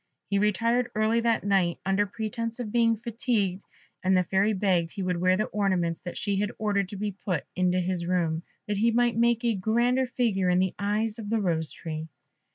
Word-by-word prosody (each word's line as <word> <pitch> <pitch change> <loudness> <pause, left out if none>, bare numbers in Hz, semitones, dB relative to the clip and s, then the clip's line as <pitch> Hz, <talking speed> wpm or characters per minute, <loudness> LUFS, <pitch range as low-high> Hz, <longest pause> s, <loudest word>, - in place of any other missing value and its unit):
He 200 - +3
retired 230 +4 +1
early 215 +2 +2
that 230 -1 +1
night, 190 -4 +2
under 195 +2 +2
pretence 230 +2 -4
of 225 -4 -4
being 230 -1 +3
fatigued, 220 -4 -1 0.4
and 185 0 +3
the 180 - +3
Fairy 195 +4 +2
begged 185 -5 +1
he 200 - -4
would 180 -1 0
wear 185 0 +3
the 215 - +1
ornaments 185 -5 0
that 175 - -7
she 200 -2 -1
had 205 +1 0
ordered 200 -3 0
to 205 - -7
be 205 +1 -2
put 185 -4 -3
into 185 0 +2
his 180 -1 -1
room, 170 -3 0 0.3
that 205 -1 -1
he 225 +3 +3
might 240 +1 +2
make 235 +1 +2
a 235 - +3
grander 235 +6 +1
figure 215 -7 0
in 180 - +3
the 185 0 +1
eyes 210 +2 -1
of 210 -2 -6
the 225 0 +1
Rose 165 -5 -1
tree. 160 -1 -6
205 Hz, 205 wpm, -27 LUFS, 185-230 Hz, 0.4 s, He